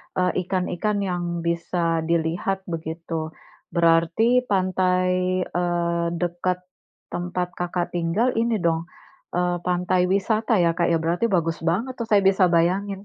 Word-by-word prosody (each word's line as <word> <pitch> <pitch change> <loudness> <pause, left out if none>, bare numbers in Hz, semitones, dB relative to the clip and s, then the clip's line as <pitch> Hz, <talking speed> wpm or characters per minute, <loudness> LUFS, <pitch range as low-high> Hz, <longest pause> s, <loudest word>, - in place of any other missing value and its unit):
eee, 180 -1 +2 0.2
ikan-ikan 190 +2 -1
yang 175 -1 -2 0.2
bisa 170 0 0
dilihat, 170 +3 0 0.2
begitu. 165 +1 -6 0.6
Berarti 170 +4 +3 0.3
pantai, 185 -1 +1
eee, 170 -1 -1 0.2
dekat 175 +1 -1 0.5
tempat 180 0 -2
Kakak 175 0 -2
tinggal, 175 +9 +1
ini 230 0 +1
dong, 165 0 +1 0.5
eee, 180 0 +1
pantai 180 0 +1
wisata 220 +3 +1
ya 170 - +4
Kak, 170 - +2
ya? 165 - +4
Berarti 170 +7 +1
bagus 165 -1 0
banget 230 +10 -1
tuh 230 - -3
saya 205 -3 +4
bisa 190 -1 +4
bayangin. 195 +4 +1
180 Hz, 130 wpm, -23 LUFS, 170-190 Hz, 0.6 s, ya